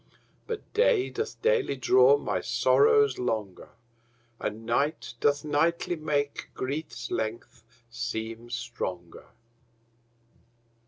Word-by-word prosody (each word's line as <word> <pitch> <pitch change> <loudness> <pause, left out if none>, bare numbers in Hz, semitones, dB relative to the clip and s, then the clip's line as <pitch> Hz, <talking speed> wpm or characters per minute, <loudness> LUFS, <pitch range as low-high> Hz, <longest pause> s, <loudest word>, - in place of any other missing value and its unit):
But 455 -2 -6
day 460 -3 +3
doth 440 - -4
daily 475 -3 +2
draw 435 +5 +5
my - - -2
sorrows 430 0 +3
longer, 110 -6 -3 0.7
And 110 +2 -4
night 140 +2 0
doth 145 +2 +2
nightly 165 +4 +1
make 145 -2 -2
grief's 145 +5 -4
length 110 +1 -4 0.3
seem 115 0 -5
stronger. 115 -8 -5
145 Hz, 95 wpm, -28 LUFS, -, 0.7 s, draw